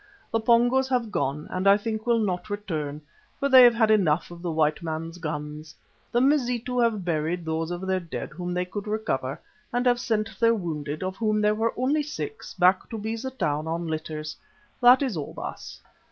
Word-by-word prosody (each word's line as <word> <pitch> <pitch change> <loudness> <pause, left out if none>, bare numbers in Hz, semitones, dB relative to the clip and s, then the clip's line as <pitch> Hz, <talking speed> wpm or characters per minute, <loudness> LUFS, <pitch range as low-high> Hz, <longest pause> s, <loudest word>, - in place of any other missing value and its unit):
The 225 - +1
Pongos 245 +3 +3
have 245 -4 0
gone 150 -4 -1
and 185 +1 -1
I 200 +1 +7
think 220 +1 -4
will 235 -1 +4
not 185 -4 -1
return, 155 -8 -4 0.4
for 280 - +1
they 260 -1 +9
have 240 -1 +7
had 220 -2 +3
enough 175 -6 +2
of 170 0 -10
the 175 - -3
white 155 -1 +1
man's 165 +1 -5
guns. 150 -1 -6 0.4
The 240 - +2
Mazitu 250 -3 +1
have 225 -6 +1
buried 165 +1 -1
those 160 0 -2
of 175 +1 -4
their 190 0 +1
dead 170 -2 -6
whom 180 0 -5
they 180 0 -1
could 200 +3 -6
recover, 140 -11 -2 0.3
and 245 +1 0
have 245 -1 +3
sent 220 -4 -2
their 230 0 +4
wounded, 155 -5 -4
of 185 +1 -4
whom 215 -1 +1
there 210 0 +3
were 225 +2 -1
only 275 +5 +1
six, 420 +9 -6
back 185 0 +3
to 225 - -5
Beza 225 +4 -4
Town 155 - -2
on 165 +1 -2
litters. 155 -1 -4 0.5
That 250 +3 +7
is 255 -8 -1
all, 150 -3 -5
Baas." - - -7
200 Hz, 195 wpm, -26 LUFS, 160-235 Hz, 0.5 s, they